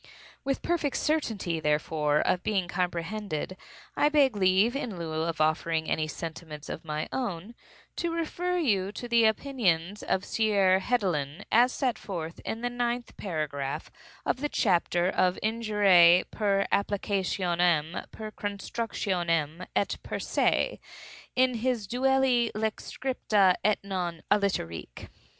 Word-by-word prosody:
With 275 0 -2
perfect 330 -5 0
certainty, 220 - -1
therefore, 150 0 +1
of 180 - +1
being 195 -4 0
comprehended, 180 0 -3 0.4
I 295 - +3
beg 280 -6 +3
leave, 195 +5 +3
in 235 -9 -3
lieu 165 -2 -4
of 165 -1 -2
offering 160 +1 +1
any 155 0 0
sentiments 155 -2 -7
of - - -5
my 155 -1 -3
own, 210 -4 -3 0.4
to 340 -1 -1
refer 345 +2 -1
you 200 - +1
to 245 - -6
the 235 -1 +4
opinions 210 -6 +1
of 190 - -1
Sieur 200 -4 +3
Hedelin, 185 - -1
as 245 +3 +5
set 255 -3 -1
forth 170 -4 -6
in 225 - -5
the 245 - 0
ninth 240 0 -2
paragraph 150 -7 -4 0.3
of - - +1
the 295 - -1
chapter 175 -5 +2
of 185 -1 +2
"Injuriae 205 -6 +5
per 200 -2 +1
applicationem, 180 -5 0
per 215 -1 -8
constructionem, 185 -6 -2
et 200 - +1
per - - -4
se," - - +1 0.6
in 255 0 +3
his 240 -2 -1
"Duelli 255 -1 +2
Lex 220 0 -3
scripta, 215 -7 +2
et 210 +1 +3
non; 180 -4 -3
aliterque." 85 - -1
195 Hz, 130 wpm, -28 LUFS, 170-235 Hz, 0.6 s, as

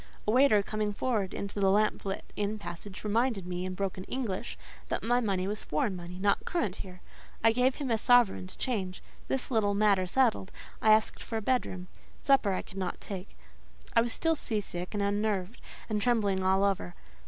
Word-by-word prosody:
A - - +4
waiter, 240 -4 +5
coming 210 0 -2
forward 210 -4 -1
into 200 +1 -5
the 195 -1 +4
lamp 210 +2 +2
lit 195 0 -3
inn 210 +1 -1
passage, 200 0 -8
reminded 220 -2 +1
me, 180 0 -3
in 185 0 -4
broken 190 -1 -3
English, 235 -4 -3 0.3
that - - -2
my 240 +2 +3
money 195 -5 0
was 210 +2 -4
foreign 170 +6 -1
money, 175 0 -8
not 200 +1 +1
current 270 - -1
here. 185 -1 -9 0.4
I 225 - +6
gave 250 +3 +2
him 270 -4 -3
a 225 - +2
sovereign 240 -6 +4
to 185 - -9
change. 195 -8 -3 0.2
This 265 0 -2
little 205 -4 +2
matter 200 -3 +3
settled, 225 -3 +1 0.3
I 220 - +3
asked 215 0 +3
for 225 - -4
a - - -2
bedroom; 195 -7 -1 0.4
supper 270 -7 +4
I 185 - -1
could 195 - -13
not 185 -2 -3
take: 195 -1 -7 0.6
I 230 - +7
was 235 0 -1
still 325 +7 +2
sea 230 -8 -1
sick 180 -1 -5
and 205 - 0
unnerved, 205 0 -1 0.3
and 210 -2 -1
trembling 205 -5 +2
all 190 +1 +3
over. 195 - 0
205 Hz, 195 wpm, -30 LUFS, 190-230 Hz, 0.6 s, I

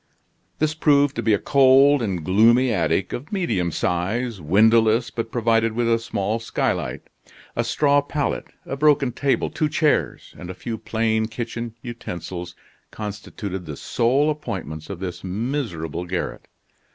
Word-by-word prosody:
This 155 0 +1
proved 145 -3 +3
to - - 0
be 110 - +1
a 105 - +4
cold 135 +3 +5
and 95 -8 -2
gloomy 115 +6 +4
attic 85 0 0
of 135 +5 -6
medium 115 - 0
size, 100 +7 -1
windowless, 110 +7 +4
but 115 -1 -4
provided 115 -1 +2
with 120 +1 0
a 115 0 +3
small 110 -1 -2
skylight. 115 - -2 0.5
A 120 - +1
straw 145 +4 +3
pallet, 145 0 -2 0.2
a - - -4
broken 145 -2 +3
table, 140 +2 0
two 155 - 0
chairs, 150 -1 0
and 90 - -8
a 90 - -6
few 115 -2 -5
plain 110 -1 0
kitchen 115 0 -5
utensils 90 -7 -6 0.3
constituted 100 -3 -6
the 75 -2 -6
sole 135 +6 +1
appointments 85 - -6
of 100 -3 -6
this 90 -2 -5
miserable 95 - -3
garret. 90 +1 -4
115 Hz, 145 wpm, -23 LUFS, 95-135 Hz, 0.5 s, cold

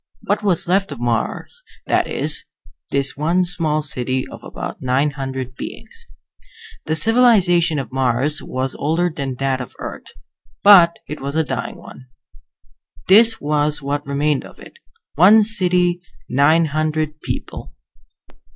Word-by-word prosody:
What - - -1
was 190 -6 +1
left 195 0 +1
of 140 - -7
Mars, 120 -2 -3 0.2
that - - +1
is; - - 0 0.4
this 140 0 -1
one 170 +5 +1
small 155 -3 -1
city 130 -3 -1
of - - -12
about - - -7
nine 130 +3 +1
hundred 130 -2 -6
beings. - - -8 0.8
The 155 - 0
civilization 185 -6 +4
of 135 -5 -5
Mars 130 +3 0
was 130 +1 -4
older 165 +4 -1
than 135 -3 -4
that 135 0 -1
of 125 - -9
Earth, - - -8 0.6
but 180 -5 +7
it 150 - -7
was 140 +2 -4
a 160 - +2
dying 145 - -5
one. 130 - -14 1.0
This 225 +3 +6
was 150 0 -1
what 145 +1 -2
remained 140 0 0
of - - -14
it: - - -15 0.3
one 200 +8 +6
city, 180 -4 +1 0.3
nine 150 +6 +3
hundred 155 0 -2
people. - - -6
150 Hz, 140 wpm, -19 LUFS, 135-175 Hz, 1.0 s, but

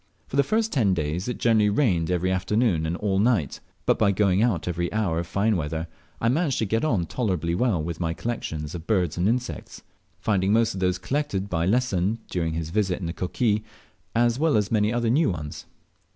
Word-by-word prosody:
For - - -6
the 140 - +5
first 220 - 0
ten 105 -9 +3
days 80 +4 -2
it 125 - -3
generally 110 -3 +3
rained 95 - +1
every 90 +1 +1
afternoon 95 -3 +1
and 85 +2 -2
all 95 -1 0
night 105 - +1
r - - -37 0.2
but - - +2
by 100 -2 +4
going 100 -1 +2
out 110 -9 +1
every 85 0 -1
hour 100 -7 0
of 85 - -4
fine 105 +4 +1
weather, 80 -1 -2 0.3
I 115 - 0
managed 140 +2 +1
to 110 - +1
get 110 +3 0
on 110 - +1
tolerably 90 -7 -1
with 85 -6 0
my 85 -1 -1
collections 80 -11 -4
of 85 0 -7
birds 90 -8 +1
and 90 +4 +3
insects, 125 +1 -3 0.4
finding 100 -2 +1
most 115 0 +3
of 95 - -5
those 90 -1 +1
collected 100 -1 -2
by 85 0 0
Lesson 105 -3 +1
during 80 -3 -1
his 80 -1 -4
visit 95 -2 0
in 95 - -5
the 85 - -3
Coquille, 105 +6 0 0.6
as 120 +1 +2
well 160 -5 +3
as 105 -1 0
many 105 -1 +2
new 120 +6 +2
ones. 75 -4 -6
100 Hz, 205 wpm, -25 LUFS, 85-115 Hz, 0.6 s, the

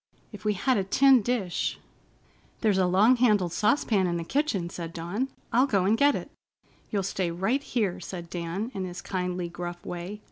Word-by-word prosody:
If 210 -1 -10
we 210 - +3
had 255 +6 +1
a 195 - +1
tin 260 +6 +5
dish——" 205 -6 -1 0.8
"There's 210 -4 +3
a 185 - +3
long 210 +8 +5
handled 210 -8 +3
saucepan 210 -1 +2
in 170 -1 -1
the 170 - -3
kitchen," 230 - 0
said 165 -1 -6
Dawn. 180 +10 -2 0.3
"I'll 255 +4 +4
go 195 -7 +2
and 210 +3 +4
get 285 +4 +4
it." - - -6 0.6
"You'll 200 -3 -1
stay 185 -2 -1
right 195 +11 0
here," 215 -10 -1
said 175 -2 -7
Dan, 175 +7 -4
in 195 -2 -3
his 175 -1 -6
kindly, 180 -1 -2
gruff 175 0 -7
way. 180 +4 -6
195 Hz, 185 wpm, -27 LUFS, 175-225 Hz, 0.8 s, tin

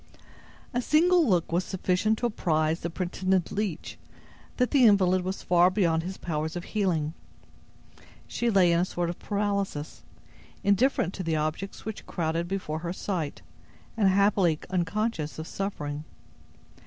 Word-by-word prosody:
A 245 - +1
single 335 +4 +4
look 175 -4 +1
was 175 +2 +1
sufficient 190 +4 0
to 240 - -2
apprise 160 -7 0
the 170 - -3
pretended 185 +1 -1
leech 200 -6 -3 0.6
that 250 -1 +1
the 275 -3 +5
invalid 185 -3 +5
was 185 +2 -4
far 175 0 +5
beyond 175 -4 +1
his 185 +3 -6
powers 160 -1 -3
of 175 - -4
healing. 170 -8 -1 1.1
She 240 - -1
lay 190 -5 +4
in 170 - +3
a 180 - +2
sort 175 -2 -2
of 175 - -10
paralysis, 200 -7 -2 0.6
indifferent 200 -2 +2
to 185 - -5
the 165 -2 0
objects 155 +6 -3
which 220 -1 -6
crowded 165 0 -1
before 175 -5 -3
her 170 +1 -4
sight, 175 -7 -4 0.5
and 205 -4 +3
happily 190 -4 +3
unconscious 180 -2 -1
of 160 - -5
suffering. 150 -7 -4
185 Hz, 145 wpm, -27 LUFS, 165-200 Hz, 1.1 s, the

